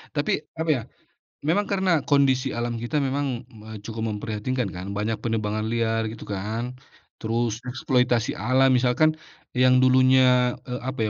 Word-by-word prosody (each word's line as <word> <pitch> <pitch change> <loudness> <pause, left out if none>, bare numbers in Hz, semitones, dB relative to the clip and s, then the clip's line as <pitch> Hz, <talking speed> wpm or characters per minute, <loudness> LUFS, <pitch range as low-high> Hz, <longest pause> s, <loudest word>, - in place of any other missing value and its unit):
Tapi 145 - +1 0.2
apa 160 0 -2
ya, 140 -6 +2 0.6
memang 175 +7 +1
karena 190 -5 +2
kondisi 135 -3 +3
alam 120 0 -2
kita 120 +6 -3
memang 140 +1 -1 0.3
me 110 0 -10
cukup 110 -1 -5
memprihatinkan 110 +2 -2
kan 90 +1 -7
banyak 105 +1 -1
penebangan 110 -2 -2
liar 115 -1 0
gitu 115 - -9
kan, 110 +5 -3 0.5
terus 115 0 -1
eksploitasi 125 -2 +1
alam 130 +4 +3
misalkan, 130 +6 +3 0.4
yang 130 0 +5
dulunya, 130 -1 +4
eee, 125 0 -4
apa 130 -5 -1
125 Hz, 140 wpm, -24 LUFS, 110-130 Hz, 0.6 s, yang